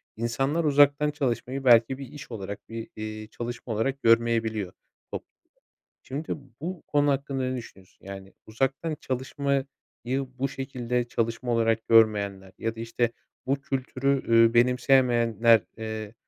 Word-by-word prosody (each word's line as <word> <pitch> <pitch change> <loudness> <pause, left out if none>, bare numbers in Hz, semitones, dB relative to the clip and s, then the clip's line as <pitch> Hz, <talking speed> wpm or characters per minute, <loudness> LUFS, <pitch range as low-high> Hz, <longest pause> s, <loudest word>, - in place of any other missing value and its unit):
insanlar 135 +8 0
uzaktan 145 0 +4
çalışmayı 130 -1 -2
belki 120 +1 +5
bir 135 -2 -8
iş 145 -2 -11
olarak, 100 0 -7
bir, 115 0 -6
iii, 110 0 -6
çalışma 120 -1 -5
olarak 135 +6 -1
görmeyebiliyor 115 -4 +2 0.4
toplumda. - - -9 0.5
Şimdi 145 +4 -5 0.3
bu 175 +1 -5
konu 145 -1 +2
hakkında 135 -1 -1
ne 130 0 -1
düşünüyorsun? 95 -5 -12
Yani 95 -1 -9
uzaktan 135 +7 -1
çalışmayı 135 +1 -1 0.7
bu 135 +1 0
şekilde 125 -2 -3
çalışma 115 +2 -1
olarak 115 -1 +1
görmeyenler 100 -4 +3
ya 115 0 -2
da 115 - -7
işte 115 +1 -1 0.3
bu 135 +1 0
kültürü, 135 0 -1
ııı, 115 0 +5
benimseyemeyenler, 120 -3 +4 0.2
eee, 110 -1 -5
120 Hz, 130 wpm, -26 LUFS, 115-135 Hz, 0.7 s, belki